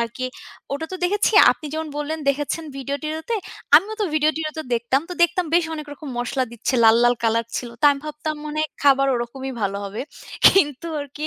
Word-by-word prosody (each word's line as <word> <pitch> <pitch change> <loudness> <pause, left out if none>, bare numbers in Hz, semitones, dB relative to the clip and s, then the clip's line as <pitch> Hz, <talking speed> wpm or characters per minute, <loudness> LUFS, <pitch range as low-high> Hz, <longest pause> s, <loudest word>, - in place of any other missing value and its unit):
আরকি 235 +2 -3 0.5
ওটা 285 +3 -3
তো - - -3
দেখেছি, 410 +5 +1 0.2
আপনি 310 - -10
যেমন 315 0 -3
বললেন 295 +2 -3
দেখেছেন 290 +3 -3
ভিডিও-টিডিওতে, 305 - -4 0.4
আমিও 410 +6 +2
তো - - +2
ভিডিও-টিডিওতে 310 +1 0
দেখতাম। 235 +3 +1
তো - - -4
দেখতাম 345 +1 +2
বেশ 345 0 +4
অনেক 305 -1 -7
রকম 290 +1 -9
মসলা 255 +2 -1
দিচ্ছে, 235 +3 -2
লাল, 225 0 +7
লাল 240 0 +4
কলার 230 0 +1
ছিলো, 240 -2 -5
তো - - 0
আমি 280 -1 -2
ভাবতাম 305 +1 -4
মনে 300 0 -4
হয়, 310 - -2
খাবার 275 -1 +5
ওরকমই 260 +3 -4
ভালো 200 0 -1
হবে। 200 +2 -6 0.5
কিন্তু 295 -5 +4
আরকি 285 +2 -6
290 Hz, 185 wpm, -22 LUFS, 255-315 Hz, 0.5 s, লাল